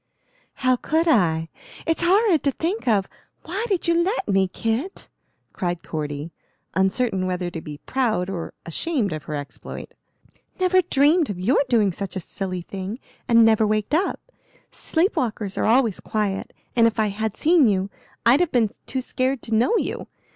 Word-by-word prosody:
"How 255 0 +4
could 320 +6 0
I? 165 - +3 0.4
It's 325 0 +1
horrid 370 -1 +4
to 280 - +4
think 340 - -3
of. 205 -4 +3 0.4
Why 380 +7 -3
did 385 -5 -1
you 335 - +4
let 390 +7 -1
me, 195 -2 +3
Kit?" 225 - -3 0.4
cried 175 -3 -3
Cordy, 150 0 -4 0.4
uncertain 190 0 +1
whether 180 -1 -2
to 165 - -6
be 150 -2 -8
proud 220 - 0
or 180 -4 -5
ashamed 220 - -1
of 155 - -6
her 150 - -4
exploit. 145 -1 -7 0.7
"Never 370 0 +4
dreamed 310 0 +3
of 190 -3 -4
your 235 +10 +3
doing 215 -5 +3
such 190 +1 -5
a - - -1
silly 185 +1 -4
thing, 195 +4 -5 0.3
and 230 -2 +6
never 220 -1 +4
waked 215 +4 -1
up. 345 +6 +1 0.5
Sleep 340 +5 0
walkers 210 -5 -2
are - - 0
always 230 -3 +3
quiet, 205 -3 -2 0.2
and 230 -1 +6
if 230 - -2
I 215 -1 +2
had 215 +1 -3
seen 320 -4 +5
you 195 -1 0 0.3
I'd 245 +5 +6
have 355 -2 +1
been 225 -5 +2 0.2
too 260 - -2
scared 255 0 -1
to 225 - -4
know 245 - +3
you. - - -3
220 Hz, 170 wpm, -23 LUFS, 190-295 Hz, 0.7 s, and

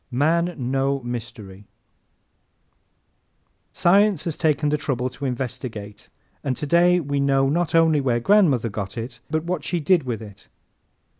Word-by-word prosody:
Man 165 +7 +1
No 135 +1 -1
Mystery 110 -5 -7 2.1
¶ - - -17
Science 195 -1 +3
has 165 -3 -2
taken 150 -1 +1
the 150 - +1
trouble 130 -4 -2
to 140 +2 -7
investigate 120 -5 -5 0.3
and 130 -3 -2
today 175 +4 +3
we 145 -3 -2
know 135 -1 +2
not 170 +2 0
only 160 -3 +4
where 125 -3 +1
grandmother 145 - +3
got 100 +1 -6
it 120 +1 -6
but 155 +1 -1
what 170 -3 -3
she 175 +2 -1
did 170 +3 +3
with 120 -5 -4
it. 105 -3 -12
140 Hz, 145 wpm, -23 LUFS, 120-165 Hz, 2.1 s, only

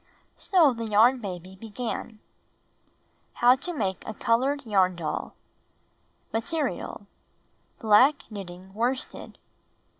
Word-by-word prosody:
So 330 -8 +3
the 230 -1 -5
Yarn 225 +5 +4
Baby 185 -2 -7
began: 220 +1 -6 1.1
How 245 +1 +5
TO 350 +7 -4
Make 195 - -2
a 220 - -5
Colored 265 +6 +1
Yarn 190 -4 +2
Doll 165 -3 -4 1.0
Material: 230 -2 -3 0.7
Black 250 +7 +4
knitting 190 -2 -9
worsted. 245 +5 -3
225 Hz, 95 wpm, -26 LUFS, 195-255 Hz, 1.1 s, How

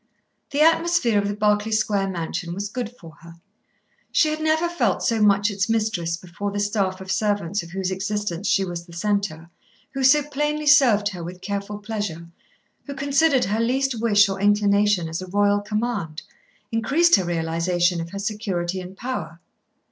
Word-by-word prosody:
The 285 +1 0
atmosphere 325 -8 +3
of 200 - -1
the 205 - -2
Berkeley 210 +1 +1
Square 210 -2 +1
mansion 170 0 -4
was 200 +1 -4
good 240 0 -4
for 165 -2 -13
her. 170 0 -13 0.8
She 310 - +3
had 310 0 -3
never 315 +2 +2
felt 345 0 0
so 230 -3 +1
much 205 +1 +4
its 195 +1 -1
mistress 215 -7 0
before 180 +3 -5
the 205 0 -4
staff 200 -2 -1
of 190 0 -5
servants 205 -3 0
of 170 - -11
whose 190 +1 -3
existence 200 -1 -3
she 195 - +2
was 175 -1 -6
the 170 - -14
centre, 175 -3 -2 0.4
who 270 -1 -2
so 290 +3 +5
plainly 295 +1 -2
served 245 -8 +5
her 180 -4 -7
with 180 +2 -8
careful 200 +1 -4
pleasure, 205 -6 -5 0.6
who 280 - -6
considered 280 0 +2
her 210 +3 -1
least 255 +1 0
wish 210 -3 +5
or 195 0 -4
inclination 205 -3 +3
as 160 +2 -4
a 185 - -7
royal 205 +2 +2
command, 210 -7 -3 0.5
increased 280 +8 +4
her 190 - -1
realisation 170 +1 0
of 165 - -6
her 200 - -7
security 195 -4 -3
and 185 +1 -10
power. 240 -9 -5
205 Hz, 175 wpm, -23 LUFS, 180-230 Hz, 0.8 s, so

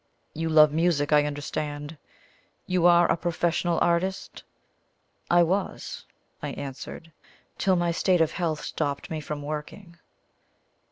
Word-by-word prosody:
You 165 +1 -2
love 155 -1 +6
music, 155 -2 +1
I 150 0 +5
understand 145 +1 -4 0.7
you 180 -1 +3
are 175 0 +6
a - - +3
professional 170 0 0
artist?" 180 +3 -1 0.9
"I 175 0 +5
was," 190 +4 -3 0.4
I - - -4
answered, 140 +4 -8 0.5
"till 190 -1 +3
my 175 -1 +1
state 180 +1 +2
of 160 -1 +2
health 160 -4 -2
stopped 140 +2 -3
me 155 -1 -3
from 145 -1 -5
working." 155 +4 -7
165 Hz, 125 wpm, -26 LUFS, 150-175 Hz, 0.9 s, love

